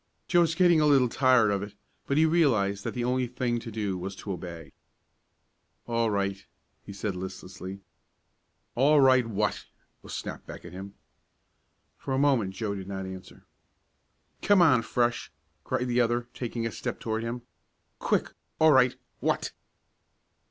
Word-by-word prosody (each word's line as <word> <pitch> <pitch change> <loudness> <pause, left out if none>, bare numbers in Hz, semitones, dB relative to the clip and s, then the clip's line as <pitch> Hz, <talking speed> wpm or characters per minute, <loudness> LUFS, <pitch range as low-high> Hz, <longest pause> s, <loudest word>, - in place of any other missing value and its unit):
Joe 175 - +4
was 165 -1 +1
getting 175 -3 +5
a 150 - +4
little 135 -4 +4
tired 125 -4 +4
of 100 -1 0
it, 100 0 -7 0.3
but 140 - 0
he 160 - +5
realized 115 -12 +2
that - - -3
the 120 - -2
only 125 +1 0
thing 120 -1 -1
to 115 - -8
do 105 -4 -3
was 95 +2 -5
to 100 - -7
obey. 85 -3 -7 1.1
"All 115 -1 0
right," 100 -1 -1 0.4
he - - -9
said, 100 0 -4
listlessly. 95 +1 -7 0.9
"All 145 +4 +4
right, 130 -3 +5
what?" 105 -1 -2 0.3
was - - -8
snapped - - -6
back - - -9
at - - -9
him. 95 +2 -9 1.0
For 135 - -3
a - - 0
moment 130 -9 +2
Joe 105 0 -2
did 95 -2 -7
not 95 -1 -5
answer. 95 0 -10 1.0
"Come 200 -3 +5
on, 130 -8 +5
Fresh.!" 120 0 -1 0.3
cried 125 - -1
the 125 0 +2
other, 120 0 0
taking 115 -2 -4
a 115 - -2
step - - -5
toward 110 0 -2
him. 120 +1 -4 0.6
"Quick - - 0 0.2
all 160 0 +6
right 125 -3 +5 0.2
what?" - - -1
115 Hz, 160 wpm, -28 LUFS, 100-130 Hz, 1.1 s, all